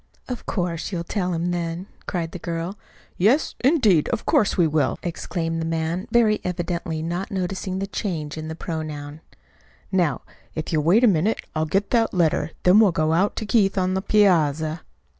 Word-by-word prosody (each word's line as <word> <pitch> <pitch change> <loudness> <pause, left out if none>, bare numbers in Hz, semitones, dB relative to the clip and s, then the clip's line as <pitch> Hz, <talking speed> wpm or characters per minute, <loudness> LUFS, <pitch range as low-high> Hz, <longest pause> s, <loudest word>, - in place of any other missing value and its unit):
"Of 250 -2 -6
course, 175 -3 -2
you'll 170 -3 -2
tell 180 0 -2
him 170 +1 -1
then," 170 +1 -3 0.2
cried 170 -3 -2
the 180 - -7
girl. 170 +3 -4 0.4
"Yes, 230 - +3
indeed, 225 - +4
of 235 - -2
course 205 - +2
we 175 - +5
will!" 155 -1 +1
exclaimed 165 -1 -3
the - - -2
man, 165 +4 -2
very 220 -3 +3
evidently 170 -2 -3
not 175 +4 -3
noticing 190 -1 -3
the 195 - -2
change 165 -7 -4
in 155 0 -6
the 160 - -5
pronoun. 155 -2 -5 0.7
"Now, 180 -5 +1 0.3
if 155 +1 -4
you'll 155 - +3
wait 180 +10 +4
a - - +7
minute 195 +2 +2
I'll 155 0 +1
get 195 +5 0
that 230 -4 +2
letter, 160 -3 +2
then 185 +4 +6
we'll 210 -4 +6
go 160 -1 +1
out 190 +5 +2
to 220 - -3
Keith 205 -3 +2
on 185 0 +1
the 190 - 0
piazza." 160 -6 +2
175 Hz, 180 wpm, -23 LUFS, 160-195 Hz, 0.7 s, a